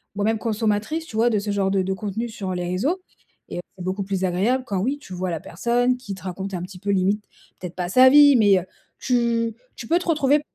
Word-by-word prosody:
moi 205 0 -1
même 220 0 +2
consommatrice, 220 +7 -1
tu 225 - -11
vois, 230 +2 +3
de 215 -3 +1
ce 205 +1 -3
genre 195 -1 0
de 195 - +2
de 190 - -1
contenus 215 +4 -4
sur 190 -2 -4
les 180 0 -3
réseaux 265 - -1 0.5
et - - -5
heu, 175 - -3 0.2
c'est 180 - -7
beaucoup 190 +2 -2
plus 190 -1 -2
agréable 205 +9 +1
quand 195 -2 -1
oui, 265 +9 0
tu 190 - -11
vois 180 +1 -3
la 165 - -2
personne 245 +9 0
qui 210 -5 -7
te 190 - -14
raconte 190 +1 -5
un 175 - -4
petit 185 0 -9
peu 200 - -5
limite, 200 +2 +1 0.4
peut-être 180 -1 -7
pas 180 -1 -3
sa 255 +6 +7
vie, 285 0 +8
mais, 200 -4 +5
heu, - - -6 0.4
tu 235 -2 0 0.2
tu 230 - -8
peux 340 - +3
te 360 - -8
retrouver. 295 -3 +3
205 Hz, 250 wpm, -23 LUFS, 190-245 Hz, 0.5 s, vie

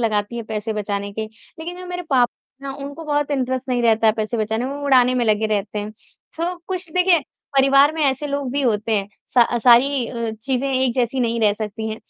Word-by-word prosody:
लगाती 215 0 -1
है 235 - -3
पैसे 220 0 -3
बचाने 200 -1 -3
के, 220 +1 -3 0.3
लेकिन 350 +3 -6
जो 365 - -8
मेरे 360 0 -5
पापा 245 -2 +3 0.3
हैं 270 - -4
उनको 285 +3 -8
बहुत 290 -1 0
इंटरेस्ट 260 -1 -1
नहीं 245 -1 0
रहता 225 -1 +3
है 215 - +6
पैसे 220 +1 -3
बचाने 220 +2 -1
में, 275 - -4
वो 285 - -8
उड़ाने 255 -2 +5
में 245 -1 +1
लगे 215 0 +2
रहते 205 +1 -4
हैं, 205 +1 -4 0.5
तो 350 +2 -2
कुछ 370 -3 -4
देखिए 360 -2 +4 0.4
परिवार 275 +2 +5
में 320 - -1
ऐसे 275 +1 0
लोग 280 -2 -3
भी 285 - 0
होते 225 -2 0
हैं, 200 -1 -2 0.3
स 240 - +8 0.2
सारी 250 +1 +5
अ, 235 -2 -3
चीज़ें 265 +1 0
एक 260 -2 +1
जैसी 250 +1 0
नहीं 235 -1 0
रह 210 -2 +4
सकती 215 +1 -5
हैं, 220 - -4
245 Hz, 225 wpm, -21 LUFS, 220-280 Hz, 0.5 s, स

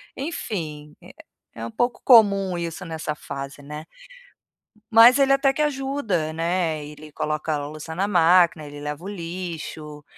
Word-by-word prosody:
Enfim, 155 - -5
eh, - - -13 0.4
é 115 - -6
um - - -5
pouco 240 - -1
comum 200 -6 +5
isso 170 -1 -5
nessa 160 -2 -4
fase, 140 -1 -8
né. 150 +2 -8 1.1
Mas 230 +3 +8
ele 275 -1 +4
até 275 0 +3
que 275 - -3
ajuda, 270 - -1
né, 165 -2 -1
ele 150 +1 -12
coloca 155 +1 -2
a - - 0
louça 155 +2 -8
na 195 +3 0
máquina, 175 -3 +4
ele 145 0 -9
leva 150 +2 -6
o - - -6
lixo, 165 -5 -7
165 Hz, 155 wpm, -23 LUFS, 150-205 Hz, 1.1 s, Mas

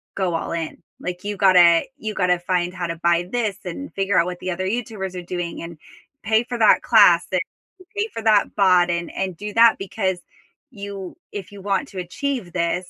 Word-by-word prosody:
go 185 -3 -1
all 165 - -3
in." 165 -2 -5 0.2
Like 180 0 -5
you 205 0 -2
gotta 180 -4 +6
you 215 -5 -5
gotta 180 -3 +1
find 175 0 -1
how 175 -2 -3
to 165 - -4
buy 170 +1 +1
this 220 -5 -1
and 230 +11 -6
figure 195 -1 0
out 170 - +4
what 180 -1 -5
the 185 - -3
other 185 +1 -3
YouTubers 205 -3 -3
are 180 - -4
doing 175 -1 -4
and 170 -1 -8 0.5
pay 220 +1 +2
for 245 0 -4
that 220 -2 +5
class 200 -7 +5
and 185 -1 +1 0.5
pay 415 +1 0
for 225 - -5
that 215 -2 +3
bot 180 -3 +4
and 170 0 -2
and 185 -3 -3
do 210 0 -6
that 230 +1 +6
because 190 -1 -2 0.5
you 200 -4 -7 0.2
if 195 -2 -7
you 200 -1 -11
want 200 +7 -1
to 190 - -7
achieve 245 +2 -4
this, 175 +1 -1
185 Hz, 205 wpm, -22 LUFS, 175-210 Hz, 0.5 s, gotta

